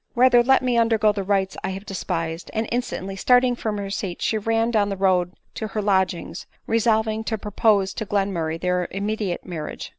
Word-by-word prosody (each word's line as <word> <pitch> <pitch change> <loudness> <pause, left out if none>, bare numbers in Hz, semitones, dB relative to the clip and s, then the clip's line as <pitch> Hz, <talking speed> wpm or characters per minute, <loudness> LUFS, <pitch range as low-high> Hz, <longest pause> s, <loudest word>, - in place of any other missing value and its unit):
Rather 245 0 +6
let 265 +2 +4
me 245 -2 +2
undergo 225 -2 +3
the 205 -1 -3
rites 190 -1 0
I 190 - -1
have 195 - -11
despised!" 165 -4 -4
and 220 0 0
instantly 215 -5 -3
stalling 245 +4 +3
from 215 -3 -3
her 200 -1 -4
seat 195 -3 -4
she - - 0
ran 225 +2 +1
down 210 -3 +2
the 195 - -3
road 185 -2 +2 0.2
to 220 - -4
her 215 +1 -3
lodgings, 190 -3 0 0.2
resolving 220 -1 +1
to 220 - -1
propose 205 -1 +1
to 220 - -4
Glenmurray 180 -6 -1
their 180 0 0
immediate 200 -2 -3
marriage. 165 -4 -6
205 Hz, 185 wpm, -23 LUFS, 190-225 Hz, 0.2 s, Rather